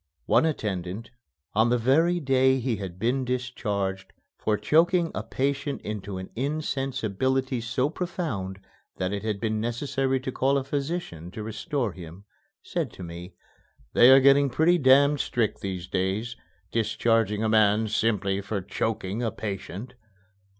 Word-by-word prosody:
One 160 - +4
attendant, 100 - -3 0.4
on 110 +3 +3
the 125 - +3
very 160 +9 +3
day 130 -2 +3
he 120 -3 -1
had 95 -3 -6
been 120 +6 0
discharged 105 -7 -3 0.2
for 105 -1 0
choking 170 - +3
a - - -2
patient 140 +5 -2
into 105 -2 -5
an 95 0 -7
insensibility 130 -2 -1
so 125 +3 0
profound 145 - -4 0.4
that 95 +1 -1
it 100 - -2
had 105 -2 -2
been 110 0 -1
necessary 130 +3 -1
to 130 - -4
call 135 +2 +2
a 135 - -1
physician 140 - -4
to 105 +4 -7
restore 115 - -2
him, 90 +2 -11 0.4
said 165 -9 -3
to 95 - -9
me, 85 +2 -8 0.6
"They 120 - +7
are 135 +1 +9
getting 140 +1 +5
pretty 165 +7 +3
damned 140 +2 +5
strict 115 -3 -1
these 95 -2 -4
days, 100 +6 -1 0.4
discharging 110 -1 +1
a - - +2
man 110 0 +4
simply 105 -3 0
for 100 +1 -3
choking 110 +2 -3
a 115 - 0
patient." 100 +3 -6
115 Hz, 145 wpm, -26 LUFS, 100-135 Hz, 0.6 s, are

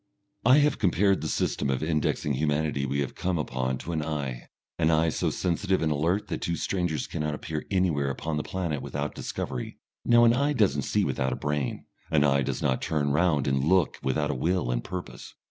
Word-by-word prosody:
I 130 +4 +7
have 150 -1 +3
compared 100 0 +3
the - - -2
system 70 - -1
of 65 +2 0
indexing 75 -2 0
humanity 75 0 0
we 70 +2 0
have 70 - -3
come 90 -1 -1
upon 65 -3 -2
to 85 - -6
an 80 -2 -1
eye, 70 -5 -4 0.3
an 80 -1 +3
eye 80 0 +3
so - - 0
sensitive 95 +1 0
and 80 - +1
alert 85 +8 0
that - - -3
two 85 - -1
strangers 90 -4 -1
cannot 75 -1 -3
appear 75 0 -5
anywhere 85 -8 +1
upon 75 +3 -3
the - - 0
planet 85 -6 -3
without 75 0 -4
discovery. - - -5 0.3
Now 120 0 +5
an 115 0 +6
eye 140 +4 +1
does 105 - +3
not 70 - -2
see - - +1
without 65 0 -1
a - - -2
brain, 75 -2 -2 0.2
an 75 -2 +3
eye 70 -1 +3
does - - -2
not 65 - +1
turn 75 -2 0
round 75 -2 +2
and 65 0 +1
look 90 +1 +2
without 75 +3 0
a - - -1
will 85 0 0
and - - -1
purpose. 85 -9 -7
75 Hz, 210 wpm, -27 LUFS, 70-90 Hz, 0.3 s, I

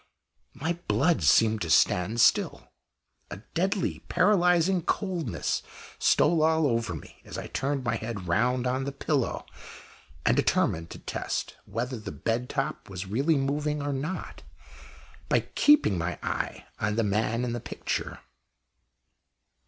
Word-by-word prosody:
My 160 +6 -2
blood 165 +3 +2
seemed 110 -1 +4
to 85 - -2
stand 90 +7 +3
still. - - +2 0.6
A - - -6 0.2
deadly 190 +3 0
paralysing 180 -1 +3
coldness 175 - -1 0.4
stole 170 -2 +4
all 160 0 +3
over 115 -9 0
me 75 - -12
as - - -8
I - - -5
turned 135 0 -2
my 115 -2 0
head 110 -5 -5
round 125 +8 +1
on 130 +1 0
the 140 - -2
pillow 140 -2 -1 0.8
and - - +4
determined 80 +1 +1
to - - -8
test - - -4
whether 120 +1 -3
the 105 - -7
bed 115 - -2
top 140 -3 -3
was 95 0 -5
really 135 +12 +1
moving 150 +2 -1
or 145 0 -1
not, 150 +7 -4 0.9
by - - +3
keeping 280 - +4
my 85 +1 -2
eye - - -3
on 105 -1 0
the 115 - +2
man 110 +3 0
in 120 - -2
the 120 - -2
picture. - - -4
130 Hz, 140 wpm, -27 LUFS, 110-160 Hz, 0.9 s, seemed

